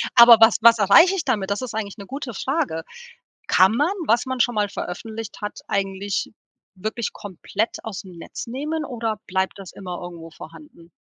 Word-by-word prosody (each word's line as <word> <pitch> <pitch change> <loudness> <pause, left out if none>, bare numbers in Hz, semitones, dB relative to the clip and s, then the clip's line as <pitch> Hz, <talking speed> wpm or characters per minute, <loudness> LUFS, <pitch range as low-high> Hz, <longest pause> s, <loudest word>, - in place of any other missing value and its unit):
aber 235 -1 +10
was 225 0 +6
was 230 0 +7
erreiche 205 - +6
ich 340 -5 -3
damit? 210 -8 -1
Das 200 - -1
ist 250 -4 -5
eigentlich 210 -2 -4
'ne 200 - -9
gute 270 +1 -6
Frage. 265 - -2 0.6
Kann 190 - +5
man, 295 +8 +2 0.2
was 230 +2 +3
man 260 -1 -4
schon 245 -1 +2
mal 205 -1 +1
veröffentlicht 220 +4 -7
hat, 210 0 -5
eigentlich 195 0 -2 0.4
wirklich 215 +4 -4
komplett 205 +3 -4
ausm 195 -3 -7
Netz 165 - -8
nehmen 300 +6 -3
oder 225 -5 -3
bleibt 190 +1 -1
das 190 -2 -9
immer 180 -2 -7
irgendwo 170 -2 -9
vorhanden? 165 +1 -14
215 Hz, 175 wpm, -22 LUFS, 190-240 Hz, 0.6 s, aber